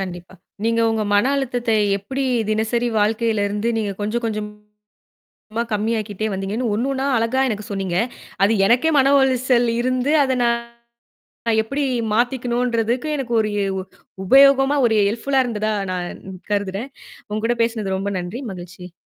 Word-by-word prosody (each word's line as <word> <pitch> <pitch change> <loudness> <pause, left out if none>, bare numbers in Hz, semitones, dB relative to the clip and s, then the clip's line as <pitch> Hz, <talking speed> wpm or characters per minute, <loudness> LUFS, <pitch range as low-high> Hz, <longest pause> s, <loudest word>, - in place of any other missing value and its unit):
கண்டிப்பா. 180 -1 -7 0.3
நீங்க 230 0 +2
உங்க 220 -1 0
மன 205 - +4
அழுத்தத்தை 245 -4 0 0.2
எப்படி 265 +7 -4 0.3
தினசரி 225 +3 0
வாழ்க்கையில 220 0 +1
இருந்து 210 +3 -2
நீங்கக் 205 -2 -3
கொஞ்சம், 230 +3 -2
கொஞ்சமா 210 -1 -7 0.9
கம்மியாக்கிட்டே 215 0 -1
வந்தீங்கன்னு 200 +5 -2
ஒண்ணு, 240 +5 -1
ஒண்ணா 270 +1 -2
அழகா 230 +4 +1
எனக்குச் 215 -1 -5
சொன்னீங்க. 190 -3 -1 0.5
அது 205 - +3
எனக்கே 245 +9 +3
மன 275 +1 +4
உளைச்சல் 255 -2 +2
இருந்து, 255 +3 0
அத 260 -1 0
நான் 235 0 +1 1.0
எப்படி 275 +6 -3 0.3
மாத்திக்கணும்ன்றதுக்கு 245 +1 0
எனக்கு 245 -3 -3
ஒரு 215 - -1
எ - - 0
உ - - -2 0.4
உபயோகமா, 275 +4 +6
ஒரு 225 - +2
ஹெல்ப்ஃபுல்லா 265 +5 +1
இருந்ததா 215 -2 -1 0.2
நான் 180 -1 -3 0.4
கருதுறேன். 205 +4 -2 0.4
உங்ககூட 225 +3 0
பேசினது 220 -5 -1
ரொம்ப 200 +1 -3
நன்றி, 180 +9 -6
மகிழ்ச்சி. 180 -1 -10
225 Hz, 135 wpm, -21 LUFS, 205-250 Hz, 1.0 s, உபயோகமா